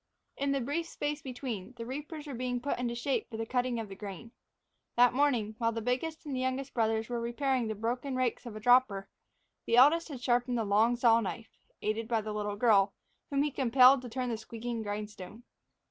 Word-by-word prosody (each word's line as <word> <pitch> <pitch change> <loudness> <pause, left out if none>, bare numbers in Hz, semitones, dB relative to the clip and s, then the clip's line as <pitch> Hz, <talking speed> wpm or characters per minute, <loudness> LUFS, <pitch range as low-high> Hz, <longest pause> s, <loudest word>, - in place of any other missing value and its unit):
In 280 0 -1
the 275 -1 0
brief 295 +7 -2
space 295 -2 -3
between, 250 -4 -6
the 230 - -5
reapers 295 +4 -6
were 285 - -6
being 245 0 -2
put 270 +1 -2
into 240 -1 -2
shape 265 +3 -1
for 220 - -6
the 225 - -2
cutting 245 0 0
of 225 - -4
the 195 - -9
grain. 205 +3 -8 0.6
That 245 0 +5
morning, 250 -6 +1
while 230 -1 +2
the 230 - -3
biggest 290 +8 -2
and 285 -3 -3
the - - -1
youngest 260 +1 -2
brothers 220 -1 +1
were 240 -1 -3
repairing 250 +1 0
the 220 - -3
broken 245 +5 -2
rakes 255 -1 -1
of 220 - -8
a - - -5
dropper, 220 -4 +4 0.6
the 230 - +3
eldest 315 +7 +6
had 275 -4 -6
sharpened 245 0 +1
the 225 - 0
long 215 +4 +3
saw 235 -1 +5
knife, 220 +2 -6 0.3
aided 215 +1 -1
by 225 -2 +1
the 215 0 -5
little 210 -1 -2
girl, 205 -3 +4 0.3
whom 280 0 +1
he 295 - -1
compelled 260 0 +6
to 250 - -8
turn 250 +1 -2
the 230 - -2
squeaking 230 +1 -5
grindstone. 210 +1 -6
240 Hz, 210 wpm, -31 LUFS, 220-260 Hz, 0.6 s, eldest